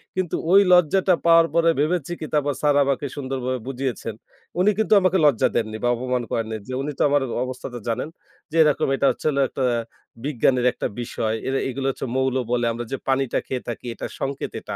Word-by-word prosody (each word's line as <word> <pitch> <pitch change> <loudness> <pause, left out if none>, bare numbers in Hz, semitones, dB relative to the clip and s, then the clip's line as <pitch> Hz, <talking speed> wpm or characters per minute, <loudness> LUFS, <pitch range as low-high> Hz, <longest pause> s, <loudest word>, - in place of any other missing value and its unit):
কিন্তু 185 -3 -1 0.2
ওই 195 - +8
লজ্জাটা 180 +2 +4
পাওয়ার 165 0 +6
পরে 170 0 +4
ভেবেছি 170 +1 0
কি - - -4
তারপর 145 -1 +1
স্যার 145 -1 +3
আমাকে 140 +1 -1
সুন্দর 135 -1 -4
ভাবে 130 -1 -1
বুঝিয়েছেন। 125 -4 -3 0.4
উনি 190 - +4
কিন্তু 220 0 +2
আমাকে 185 0 +3
লজ্জা 140 -7 +4
দেননি 110 -2 -1
বা 120 - +2
অপমান 125 0 -2
করেননি, 110 -1 -2
যে 130 - -5
উনি 150 - -3
তো - - 0
আমার 145 0 +3 0.2
অবস্থাটা 125 -1 -6
জানেন, 115 +6 -1 0.4
যে - - -7
এরকম 150 -2 +2
এটা 135 - 0
হচ্ছে - - -10
হলো 140 -1 +1
একটা 135 - -3 0.6
বিজ্ঞানের 130 -3 +1
একটা - - -3
বিষয়। 110 -1 -2
এরে 135 0 0
এগুলা 135 +1 -3
হচ্ছে 135 - -6
মৌল 130 -1 +1 0.2
বলে 120 -1 +1
আমরা 120 +1 -5
যে 135 - -1
পানিটা 135 -1 +1
খেয়ে 130 -1 -3
থাকি 120 - -6
এটা - - -6
সংকেত 135 0 -3
এটা। - - -6
135 Hz, 200 wpm, -23 LUFS, 125-150 Hz, 0.6 s, ওই